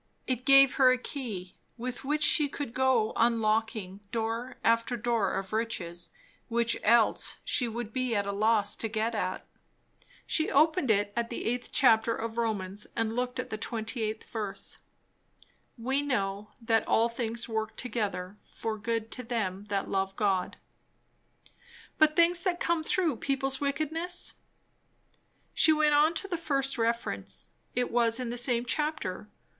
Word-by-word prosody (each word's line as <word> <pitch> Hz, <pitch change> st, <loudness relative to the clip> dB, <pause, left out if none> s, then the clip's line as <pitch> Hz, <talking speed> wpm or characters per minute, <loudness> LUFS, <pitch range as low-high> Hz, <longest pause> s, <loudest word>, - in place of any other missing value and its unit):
It 255 Hz, -1 st, -2 dB
gave 275 Hz, -1 st, +7 dB
her 260 Hz, -2 st, +6 dB
a 255 Hz, -, +2 dB
key, 225 Hz, -9 st, -6 dB, 0.2 s
with 245 Hz, +1 st, -5 dB
which 295 Hz, +2 st, 0 dB
she 295 Hz, -1 st, +5 dB
could 275 Hz, -4 st, -5 dB
go 255 Hz, -4 st, +2 dB
unlocking 220 Hz, -4 st, +1 dB
door 230 Hz, +2 st, -3 dB
after 230 Hz, +2 st, +2 dB
door 230 Hz, -3 st, 0 dB
of 195 Hz, +1 st, -4 dB
riches, 175 Hz, -7 st, -3 dB, 0.4 s
which 230 Hz, -1 st, +1 dB
else 230 Hz, +1 st, +3 dB
she 245 Hz, -, +3 dB
would 230 Hz, -1 st, -5 dB
be 255 Hz, -3 st, 0 dB
at 200 Hz, -1 st, +1 dB
a 200 Hz, -, -2 dB
loss 210 Hz, 0 st, +2 dB
to 225 Hz, -, -1 dB
get 220 Hz, +1 st, -1 dB
at. 185 Hz, -4 st, -3 dB, 0.8 s
She 315 Hz, -, 0 dB
opened 310 Hz, 0 st, +3 dB
it 205 Hz, -1 st, +2 dB
at 235 Hz, 0 st, -1 dB
the -, -, -5 dB
eighth 245 Hz, +2 st, -2 dB
chapter 230 Hz, -3 st, +4 dB
of 230 Hz, +1 st, -4 dB
Romans 205 Hz, -3 st, -2 dB
and 225 Hz, 0 st, -1 dB
looked 250 Hz, +1 st, -2 dB
at 255 Hz, -, -5 dB
the 215 Hz, -, -4 dB
28th 220 Hz, -1 st, -3 dB
verse. 210 Hz, -4 st, -6 dB, 1.0 s
"We 265 Hz, +4 st, 0 dB
know, 205 Hz, -7 st, -2 dB
that 225 Hz, -1 st, +1 dB
all 225 Hz, +1 st, +3 dB
things 230 Hz, -1 st, -2 dB
work 220 Hz, -1 st, -3 dB
together 210 Hz, -5 st, -3 dB
for 220 Hz, -1 st, -5 dB
good 225 Hz, +1 st, -2 dB
to 250 Hz, -, -4 dB
them 205 Hz, -5 st, -3 dB
that 200 Hz, -1 st, -2 dB
love 195 Hz, 0 st, -1 dB
God 195 Hz, -4 st, 0 dB, 0.7 s
" -, -, -24 dB
But 310 Hz, 0 st, +5 dB
things 340 Hz, +1 st, +4 dB
that 355 Hz, -2 st, -1 dB
come 335 Hz, -2 st, 0 dB
through 325 Hz, -6 st, +1 dB
people's 270 Hz, +1 st, -1 dB
wickedness? 315 Hz, +5 st, 0 dB, 1.2 s
She 320 Hz, -, +4 dB
went 305 Hz, -1 st, +3 dB
on 305 Hz, +3 st, +4 dB
to 395 Hz, -, 0 dB
the 355 Hz, -3 st, -2 dB
first 275 Hz, -5 st, 0 dB
reference. 230 Hz, +1 st, -2 dB, 0.2 s
It 250 Hz, 0 st, 0 dB
was 235 Hz, 0 st, +2 dB
in 245 Hz, -2 st, -3 dB
the 240 Hz, -, -4 dB
same 240 Hz, 0 st, +3 dB
chapter. 295 Hz, -10 st, -2 dB
230 Hz, 155 wpm, -29 LUFS, 215-270 Hz, 1.2 s, gave